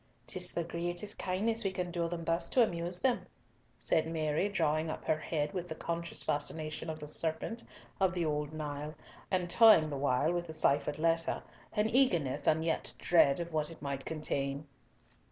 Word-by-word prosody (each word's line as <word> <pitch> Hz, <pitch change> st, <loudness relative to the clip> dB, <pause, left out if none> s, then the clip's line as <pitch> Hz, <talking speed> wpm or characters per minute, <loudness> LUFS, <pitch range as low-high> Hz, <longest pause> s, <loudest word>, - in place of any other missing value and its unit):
'Tis 180 Hz, -1 st, +1 dB
the 170 Hz, -, -1 dB
greatest 175 Hz, +4 st, -4 dB
kindness 220 Hz, +5 st, +1 dB
we 195 Hz, -, 0 dB
can 180 Hz, -1 st, -3 dB
do 170 Hz, -1 st, -1 dB
them 170 Hz, -1 st, -4 dB
thus 165 Hz, +1 st, +1 dB
to 250 Hz, -, +5 dB
amuse 175 Hz, -3 st, +1 dB
them," 255 Hz, -2 st, +1 dB, 0.5 s
said 160 Hz, 0 st, +1 dB
Mary, 160 Hz, +3 st, 0 dB
drawing 160 Hz, -4 st, +1 dB
up -, -, -5 dB
her 155 Hz, -, +1 dB
head 150 Hz, -2 st, -2 dB
with 175 Hz, -1 st, -4 dB
the 160 Hz, -, -4 dB
conscious 170 Hz, +1 st, -3 dB
fascination 155 Hz, +2 st, -2 dB
of 160 Hz, -, -4 dB
the 150 Hz, -, -8 dB
serpent 160 Hz, +9 st, -1 dB, 0.4 s
of 185 Hz, -1 st, +2 dB
old 150 Hz, -3 st, -1 dB
Nile, 150 Hz, 0 st, -5 dB, 0.3 s
and 180 Hz, -2 st, 0 dB
toying 180 Hz, -5 st, +6 dB
the 140 Hz, -, -2 dB
while 140 Hz, +4 st, +2 dB
with 175 Hz, 0 st, -2 dB
the 160 Hz, -, -6 dB
ciphered 145 Hz, -1 st, +1 dB
letter, 165 Hz, +1 st, +1 dB, 0.3 s
in 210 Hz, +1 st, +3 dB
eagerness, 175 Hz, -, +2 dB
and 160 Hz, +1 st, +3 dB
yet 165 Hz, -, -1 dB
dread, 155 Hz, -5 st, +4 dB
of 170 Hz, -1 st, -5 dB
what 155 Hz, -1 st, 0 dB
it 165 Hz, -, -11 dB
might 140 Hz, -1 st, -4 dB
contain. 140 Hz, -2 st, -2 dB
165 Hz, 180 wpm, -32 LUFS, 150-175 Hz, 0.5 s, toying